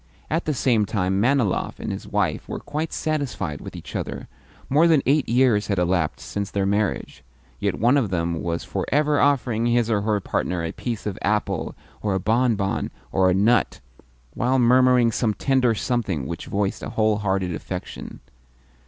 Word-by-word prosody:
At 165 +2 0
the 155 - 0
same 115 -5 +2
time, 95 -1 0
Manilov 125 -4 +1
and - - -4
his - - -6
wife - - -1
were - - -3
quite 155 +2 -4
satisfied 125 - -2
with - - -9
each - - -9
other. - - -4 0.4
More 150 +5 +4
than 160 -4 +4
eight 145 -1 +2
years 115 -4 +3
had 100 - 0
elapsed 90 -2 0
since 100 -1 -3
their 100 0 -1
marriage, 100 +1 -1 0.4
yet - - -1
one 120 +6 +4
of 120 -8 +1
them 85 -2 -1
was 85 -1 -2
for - - -3
ever 150 +1 +2
offering 120 -5 +2
his 120 -1 +2
or 105 -2 +2
her 105 0 +1
partner 90 -2 -2
a 80 - -2
piece 120 -4 -5
of 105 -3 -4
apple 105 +2 -1 0.3
or 100 -2 0
a - - +1
bonbon 110 -2 +1 0.2
or 95 -1 +3
a 90 - +2
nut, 110 +5 +2 0.5
while 125 +3 +1
murmuring 125 -1 +5
some 110 -1 0
tender 130 -4 +2
something 105 - -1
which 85 +4 -6
voiced 100 0 -1
a - - -5
whole 110 -1 +1
hearted 95 -3 -1
affection. 75 - -7
110 Hz, 180 wpm, -23 LUFS, 95-125 Hz, 0.5 s, murmuring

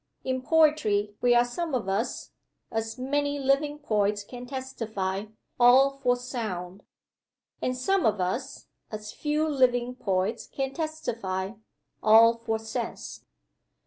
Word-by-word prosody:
In 260 0 -1
poetry 260 -10 +3
we 245 -1 +4
are 240 0 +5
some 310 +4 -3
of 230 -6 -2
us 200 +5 -2 0.4
(as 225 +1 -3
many 285 +2 -1
living 280 +2 +1
poets 210 -7 0
can 245 +3 -9
testify) 220 -7 -3 0.3
all 255 +3 +7
for 245 -2 +3
sound; 205 -7 -5 0.8
and 255 0 -1
some 385 +7 +2
of 210 -2 +1
us 180 0 -3 0.3
(as 215 0 -6
few 300 +1 0
living 250 -4 +2
poets 200 -2 -1
can 270 -1 -3
testify) 230 - -3 0.5
all 225 +2 +7
for 225 -1 -1
sense. 220 0 -6
245 Hz, 125 wpm, -27 LUFS, 210-275 Hz, 0.8 s, all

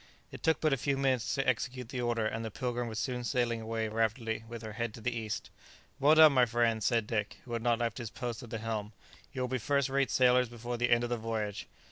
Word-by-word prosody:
It - - -9
took 160 0 +2
but 155 -3 +2
a - - +2
few 140 +2 0
minutes 130 -3 +1
to 135 -1 -1
execute 125 -1 -1
the 125 -1 -3
order, 120 -2 0
and 110 +1 -2
the 110 - -3
"Pilgrim" 120 +2 -3
was 110 -2 -5
soon 125 0 -2
sailing 120 -2 0
away 110 0 -2
rapidly 110 +1 -1
with 115 0 -8
her 110 -1 -6
head 115 -1 -3
to - - -10
the 120 +2 -1
east. 110 -2 -4 0.5
"Well 145 +3 +6
done, 155 -2 +8
my 125 -2 +5
friends!" 115 -1 +1
said 115 -3 +2
Dick, 105 -2 -2
who 120 - -7
had 115 - -1
not 120 0 +2
left 115 0 -2
his 120 -3 -5
post 120 0 -5
at 120 - -10
the 115 - -3
helm; 110 -1 -4 0.4
"you 130 - -4
will 125 - 0
be 130 0 -2
first 140 +3 +1
rate 135 0 +1
sailors 125 -1 +4
before 120 +1 -5
the 120 +1 +1
end 120 0 +4
of 120 - -3
the 120 - +1
voyage." 110 -3 -3
120 Hz, 255 wpm, -31 LUFS, 115-125 Hz, 0.5 s, done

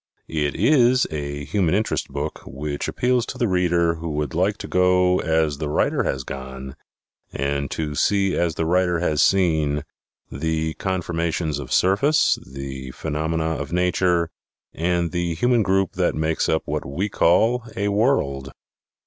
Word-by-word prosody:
It 75 -2 -1
is 130 -3 +4
a 70 -1 -4
Human 90 +2 +1
Interest 110 +2 -1
book 70 +2 -5
which 70 +1 -4
appeals 125 -1 +1
to - - -6
the 120 -2 +1
reader 85 -3 +2
who 85 +1 -5
would 75 -3 -2
like 95 +5 +1
to - - -7
go 90 0 +3
as 80 -3 0
the 75 -1 -2
writer - - +1
has 65 -1 -2
gone 65 0 -7 0.6
and 70 0 -2
to 75 -2 -3
see 95 +5 +1
as 85 -2 0
the 80 - -1
writer 90 +1 +2
has 75 -4 +1
seen 80 -6 +2 0.5
the 80 +2 -2
conformations 85 -4 -2
of 70 - -8
surface, 100 +12 +3
the 65 -1 -7
phenomena 80 +3 -2
of 75 +1 -6
nature 90 -1 +1 0.4
and 85 0 0
the 85 -2 -1
human 120 +6 +2
group 95 -2 +1
that 90 -1 0
make 80 0 0
up 80 - +1
what - - -2
we 80 +10 -2
call 110 +7 +3 0.2
a 100 +1 0
"world." 70 - 0
85 Hz, 155 wpm, -22 LUFS, 75-95 Hz, 0.6 s, is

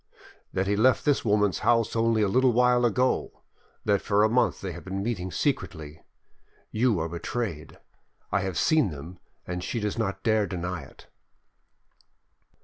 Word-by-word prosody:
"That 95 - -1
he 100 +1 +1
left 125 +5 +3
this 145 -2 +2
woman's 105 -5 +2
house 115 0 +2
only 115 -1 +2
a - - +2
little 130 +5 +3
while 125 +1 +3
ago, 125 +3 0 0.4
that 100 -2 +2
for 105 0 +2
a 110 - +4
month 125 +3 +2
they - - -5
have - - -9
been 95 +1 -4
meeting 100 -5 -3
secretly. 80 - -3 0.7
You 115 -1 +2
are 80 - -1
betrayed: 85 0 -5 0.5
I 100 - +2
have 95 -3 -3
seen 155 - +3
them 80 +4 -9 0.3
and 90 0 -4
she 115 - -3
does 105 +1 -3
not 100 -3 -2
dare 110 -2 +2
to 95 - -5
deny 90 -1 -3
it." 70 - -15
105 Hz, 165 wpm, -26 LUFS, 90-120 Hz, 0.7 s, a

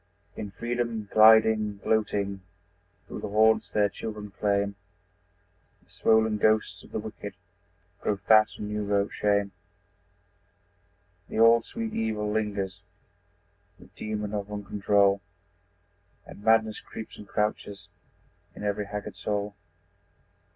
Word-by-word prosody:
In 105 - -5
freedom 115 0 -3
gliding, 110 -1 +6
gloating, 100 -2 -1 0.6
Through - - -7
the - - -5
haunts 110 +2 +3
their 105 -1 +2
children 105 0 -7
claim 100 0 0 1.1
The - - -28
swollen 110 -1 +2
ghosts 110 0 +2
of - - -17
the - - -3
wicked - - -7 0.6
Grow 105 - -1
fat 110 +2 +5
on 105 - -5
new 105 0 -2
wrought 100 0 0
shame. 100 -1 +1 1.8
The - - -5
old, 115 +1 +6
sweet 225 -1 -5
evil 105 -2 -1
lingers, 100 -3 -2 1.0
The - - -17
demon 105 -1 -4
of 105 0 -4
uncontrol, 100 -1 +2 1.0
And - - -12
madness 110 -1 +3
creeps 110 - -10
and 105 - -11
crouches 105 -1 -2 0.7
In - - -9
every 105 0 -1
haggard 105 0 -6
soul. 105 0 -2
105 Hz, 115 wpm, -27 LUFS, 100-110 Hz, 1.8 s, gliding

